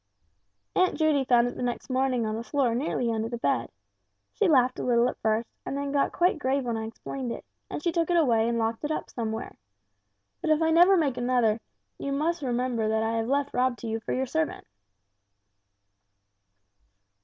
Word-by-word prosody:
"Aunt 370 0 +2
Judy 305 -4 +2
found 240 -1 +4
it 245 - -5
the - - -6
next 245 -1 -3
morning 255 -2 +1
on 215 0 -2
the 225 - -4
floor 260 -2 +1
nearly 245 -2 -1
under 225 0 -2
the 240 - -4
bed. - - 0 0.6
She 420 - +2
laughed 255 -5 +3
a - - -3
little 240 -1 +3
at - - -4
first, 220 +1 0 0.2
and 275 - -4
then 280 0 -3
got 280 -1 +1
quite 355 -2 +2
grave 270 0 0
when 235 -1 -1
I 220 0 -3
explained 245 +2 -6
it, - - -7 0.2
and 295 - -5
she 340 - +1
took 335 0 0
it 350 - +3
away 235 -8 +3
and 235 - 0
locked 225 +2 -1
it 295 - -1
up 310 - -3
somewhere. 225 -2 -4 0.9
But - - -2
if 310 -1 +4
I 320 0 +2
never 355 +4 +6
make 285 -7 +1
another, 240 -3 +2 0.4
you 280 - -3
will 310 +5 +1
remember 245 -3 -1
that 220 0 +1
I 225 +1 0
have 225 0 -1
left 280 +2 0
Rob 255 -1 +1
to 235 - -7
you 225 0 -2
for 220 - -6
your 260 +1 0
servant." 315 +4 -2
250 Hz, 200 wpm, -27 LUFS, 230-285 Hz, 0.9 s, never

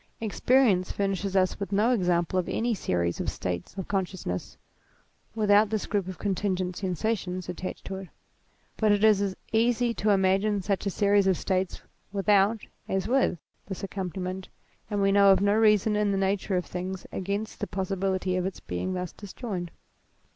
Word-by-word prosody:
Ex 220 -3 -4
perience 235 -9 +4
furnishes 195 -1 -1
us 185 -1 +2
with 200 0 -4
no 210 +5 +3
example 180 -5 +1
of 180 - -3
any 235 +1 0
series 85 - -1
of - - -1
states 90 - -4
of 190 - -4
consciousness, 185 - -3 0.8
without 210 -1 +4
this 215 -1 -1
group 200 -4 -1
of 185 - -6
con 200 -2 -1
tingent 185 -1 -1
sensations 185 0 -2
attached 180 +1 -6
to 190 - -4
it; 190 -1 -8 0.7
but 215 -1 +3
it 205 0 +2
is 215 -2 +5
as 195 -2 -1 0.2
easy 235 +1 +2
to 215 -1 -1
imagine 195 +1 +3
such 195 +1 -1
a - - +2
series 200 0 +3
of 190 -2 +3
states 185 -1 -1 0.3
without, 200 +2 +3 0.3
as 190 +1 0
with, 260 -7 +2 0.3
this 190 -1 -6
accompaniment, 185 -1 -4 0.4
and 205 -1 0
we 195 - +4
know 200 0 +6
of 190 - +5
no 200 +1 +3
reason 215 -1 +4
in 210 0 +2
the 195 - +1
nature 195 0 0
of 180 - -1
things 185 +1 -5
against 200 +3 -3
the 205 - -2
possibility 190 0 -1
of 185 - 0
its 190 - -6
being 90 - -3
thus 180 -2 -4
disjoined. 195 -3 -6
195 Hz, 175 wpm, -27 LUFS, 185-205 Hz, 0.8 s, know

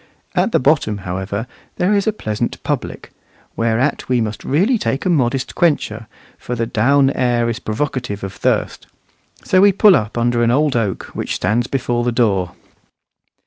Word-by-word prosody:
At - - +1
the - - +3
bottom, 130 -6 +2
however, 95 +4 -3 0.3
there 185 +4 +1
is 200 0 +1
a - - +4
pleasant 110 - -3
public; - - -4 0.4
whereat 115 +6 0
we 125 -1 +2
must 110 -2 -3
really 200 - +2
take 135 -3 -2
a 185 - +2
modest 135 -3 0
quencher, 115 -9 0 0.3
for 125 - -4
the 115 -1 -1
down 135 +5 +3
air 120 -3 +1
is 115 - -5
provocative 115 -3 -3
of 95 - -5
thirst. - - -1 0.6
So 185 - +3
we 200 0 +6
pull 200 0 +6
up 105 -2 -2
under 120 0 +1
an 115 - +3
old 145 +3 +2
oak 110 -5 -2
which - - -3
stands 120 +3 0
before 120 -3 -1
the 120 - 0
door. 100 -7 +1
120 Hz, 170 wpm, -18 LUFS, 110-145 Hz, 0.6 s, we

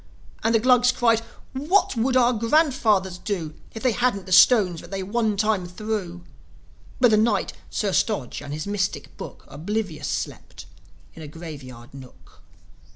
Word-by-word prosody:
And 225 +1 +2
the - - +5
Glugs 250 +1 +4
cried, 230 -3 +2 0.3
"What 350 +7 +1
would 255 +3 +1
our 245 0 +4
grandfathers 225 - +2
do 180 -7 -4 0.2
If 225 - -7
they 255 - +3
hadn't 235 -4 0
the 190 - -10
stones 185 -3 +5
that - - -13
they 195 -1 -4
one 215 +1 -1
time 210 -3 0
threw?" 180 -2 -5 0.8
But 245 -2 +5
the 215 - +5
Knight, 220 0 +1 0.2
Sir 200 -3 -1
Stodge, 190 - -1
and 145 0 -8
his 155 +2 -4
mystic 200 -2 -3
Book - - -10
Oblivious 185 +2 -4
slept - - -5 0.5
in 165 - -12
a 155 - -8
grave 155 -1 -9
yard 120 -2 -13
nook. 130 -9 -15
210 Hz, 160 wpm, -24 LUFS, 175-235 Hz, 0.8 s, the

